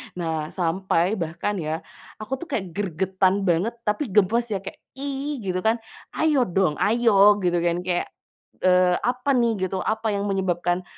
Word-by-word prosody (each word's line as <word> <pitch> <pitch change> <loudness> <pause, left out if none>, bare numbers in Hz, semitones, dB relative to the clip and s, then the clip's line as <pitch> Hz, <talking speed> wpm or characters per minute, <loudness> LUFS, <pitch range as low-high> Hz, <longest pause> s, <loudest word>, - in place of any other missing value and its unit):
Nah, 160 -3 -2
sampai 185 +2 0
bahkan 170 +5 -2
ya, 155 0 -3 0.4
aku 215 +5 -5
tuh 345 - -8
kayak 210 -8 -1
gregetan 190 +1 0
banget 190 +5 +1
tapi 210 +7 -1
gemes 215 +4 +3
ya 195 - -1
kayak, - - -8 0.2
"ih!" 280 0 -4
Gitu 185 -1 -1
kan. 225 +4 +1 0.4
"Ayo 300 -5 +2
dong, 180 -4 +1
ayo!" 210 -2 +5
Gitu, 175 -1 +2
kan. 170 +1 0
Kayak, 180 -1 -1 0.6
eee, 180 -1 +4
apa 250 +3 -1
nih, 225 -6 +1
gitu, 190 - -4
apa 220 +1 -1
yang 200 - -1
menyebabkan 180 -2 0
190 Hz, 160 wpm, -24 LUFS, 175-225 Hz, 0.6 s, ayo